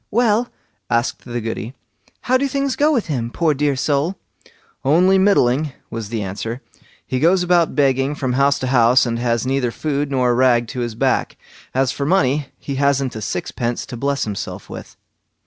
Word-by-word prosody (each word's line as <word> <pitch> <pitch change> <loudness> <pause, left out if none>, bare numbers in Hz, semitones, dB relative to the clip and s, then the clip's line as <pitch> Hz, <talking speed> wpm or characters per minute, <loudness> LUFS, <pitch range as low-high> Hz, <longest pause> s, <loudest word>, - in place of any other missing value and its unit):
"Well", 235 +1 +2 0.4
asked 120 +1 -1
the 120 -1 -4
Goody, 115 +2 -5 0.5
"how 255 - +1
do 275 +2 +2
things 275 -1 -1
go 300 +2 +3
with 245 -8 +1
him, 125 -7 -2
poor 160 +4 +1
dear 145 0 0
soul?" 145 +6 0 0.7
"Only 180 +7 +4
middling", 150 -7 +2 0.2
was 115 -3 -5
the 110 -2 -3
answer; 105 +5 -5 0.5
"he 130 - -2
goes 180 +5 +3
about 175 -2 +2
begging 135 0 +2
from 130 -3 -2
house 140 +2 +3
to 130 - -2
house, 125 +1 +5
and 115 -1 -2
has 120 0 0
neither 130 -1 0
food 145 +3 -2
nor 130 -3 +2
a - - +2
rag 120 -1 +3
to 125 - -5
his 120 -2 -3
back. - - 0 0.4
As 130 -1 +2
for 140 - -3
money, 145 -5 +2
he 140 -2 -5
hasn't 140 -2 +1
a 110 - -5
sixpence 120 +3 -3
to 125 - -8
bless 140 +3 -1
himself 105 -2 -6
with." - - -9
135 Hz, 180 wpm, -20 LUFS, 120-155 Hz, 0.7 s, house